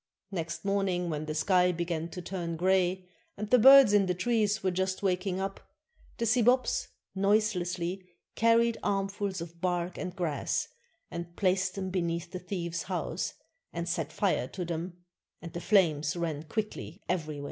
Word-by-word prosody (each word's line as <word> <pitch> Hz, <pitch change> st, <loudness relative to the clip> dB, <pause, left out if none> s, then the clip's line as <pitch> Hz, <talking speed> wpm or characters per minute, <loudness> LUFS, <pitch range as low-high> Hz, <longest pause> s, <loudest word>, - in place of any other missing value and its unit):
Next 170 Hz, 0 st, -4 dB
morning, 190 Hz, -3 st, 0 dB
when 150 Hz, 0 st, -3 dB
the 155 Hz, 0 st, -4 dB
sky 180 Hz, +2 st, +3 dB
began 170 Hz, -1 st, -3 dB
to 180 Hz, +1 st, -7 dB
turn 170 Hz, -2 st, -4 dB
gray 185 Hz, +1 st, +1 dB, 0.3 s
and 210 Hz, +1 st, -5 dB
the 250 Hz, -, +7 dB
birds 270 Hz, -2 st, +9 dB
in 200 Hz, -2 st, +4 dB
the 180 Hz, -, 0 dB
trees 210 Hz, +1 st, +1 dB
were 185 Hz, -, +2 dB
just 190 Hz, +2 st, -1 dB
waking 185 Hz, 0 st, 0 dB
up, 195 Hz, 0 st, -3 dB, 0.6 s
the 230 Hz, -, -1 dB
Sibops 250 Hz, -, +3 dB, 0.3 s
noiselessly 190 Hz, -3 st, 0 dB, 0.2 s
carried 230 Hz, 0 st, +3 dB
armfuls 195 Hz, -1 st, -1 dB
of 170 Hz, 0 st, -9 dB
bark 175 Hz, -1 st, -1 dB
and 180 Hz, -1 st, -5 dB
grass, 170 Hz, -6 st, -1 dB, 0.4 s
and 170 Hz, 0 st, -6 dB
placed 185 Hz, -1 st, +1 dB
them 190 Hz, -1 st, -3 dB
beneath 170 Hz, -1 st, -2 dB
the 185 Hz, -, -5 dB
thieves' 170 Hz, -3 st, -4 dB
house, 180 Hz, -, -2 dB, 0.4 s
and 170 Hz, 0 st, -4 dB
set 165 Hz, -3 st, -2 dB
fire 185 Hz, -10 st, 0 dB
to 180 Hz, +4 st, -5 dB
them, 170 Hz, +1 st, -4 dB, 0.4 s
and 170 Hz, -1 st, -9 dB
the 170 Hz, -, -4 dB
flames 160 Hz, -8 st, +3 dB
ran 160 Hz, -3 st, -3 dB
quickly 210 Hz, -1 st, -4 dB
everywhere. 155 Hz, -4 st, -2 dB
180 Hz, 160 wpm, -30 LUFS, 170-200 Hz, 0.6 s, birds